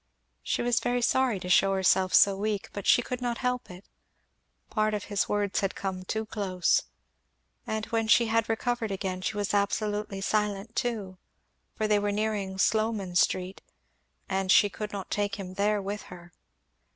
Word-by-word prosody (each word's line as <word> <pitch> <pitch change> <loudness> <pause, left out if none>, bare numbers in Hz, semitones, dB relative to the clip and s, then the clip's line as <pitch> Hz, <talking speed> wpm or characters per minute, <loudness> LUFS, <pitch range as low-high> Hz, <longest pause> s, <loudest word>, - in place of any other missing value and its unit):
She - - -1
was 240 -1 +2
very 245 0 0
sorry 255 -5 +2
to 180 - -6
shew 195 +2 +4
herself 190 -1 +3
so 200 -1 +6
weak, 205 0 -2
but 200 - -5
she 245 - +5
could 250 +1 -5
not 240 -1 -1
help 250 -1 -2
it; 180 +2 -11 0.9
part 215 -1 +1
of 205 - -4
his 205 -2 -1
words 205 -1 0
had 195 -1 -1
come 185 -2 -4
too 220 +3 -2
close. 190 -5 +1 0.9
And 220 0 -2
when 225 -1 -1
she 235 +1 +5
had 230 0 +1
recovered 225 0 -1
again 190 -2 -3
she 210 +3 -2
was 205 0 -1
absolutely 205 0 -1
silent 210 +1 -1
too, 210 -7 -3 0.6
for 215 - -1
they 210 -1 +3
were 205 0 0
nearing 205 -2 -2
Sloman 215 -2 +1
street 185 +1 +1 0.7
and 190 -1 0
she 205 0 +6
could 210 +2 -5
not 195 -2 -6
take 205 -1 -1
him 190 -2 -7
there 205 +2 +1
with 205 +2 -4
her. 175 -1 -12
205 Hz, 175 wpm, -28 LUFS, 195-220 Hz, 0.9 s, so